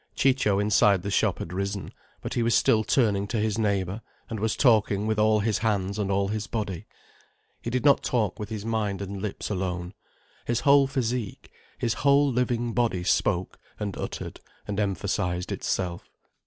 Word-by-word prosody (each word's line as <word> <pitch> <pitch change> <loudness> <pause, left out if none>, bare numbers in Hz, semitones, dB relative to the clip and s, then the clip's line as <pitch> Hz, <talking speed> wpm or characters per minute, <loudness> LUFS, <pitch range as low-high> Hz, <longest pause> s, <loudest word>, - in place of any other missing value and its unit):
Ciccio 130 -7 +2
inside 100 -2 +3
the 100 - -3
shop 105 -1 +2
had 85 - -6
risen, 100 +1 -3 0.3
but - - -4
he 120 - 0
was 115 0 +2
still 110 -1 +4
turning 105 -5 +2
to 115 - -2
his 110 +1 0
neighbour 100 -1 0 0.3
and 110 - -3
was 110 +1 0
talking 110 -5 +3
with 110 0 0
all 110 0 +4
his 110 0 0
hands 100 -2 -1
and 100 -2 -1
all 100 0 +1
his 110 +1 -3
body. 105 -6 -4 0.7
He - - -4
did 125 +3 -1
not 140 -1 +6
talk 110 -5 0
with 105 -1 -5
his 110 -2 -5
mind 110 -3 -1
and 100 0 -6
lips 105 0 -4
alone. 90 -1 -3 0.5
His 120 0 0
whole 140 -1 +5
physique, 125 -4 -3 0.3
his 115 -2 0
whole 140 0 +4
living 120 -1 0
body 115 -7 0
spoke 90 0 0 0.2
and 100 -2 -3
uttered - - -6 0.3
and 105 0 -2
emphasized 95 -3 -1
itself. 90 -1 -3
105 Hz, 175 wpm, -26 LUFS, 100-115 Hz, 0.7 s, not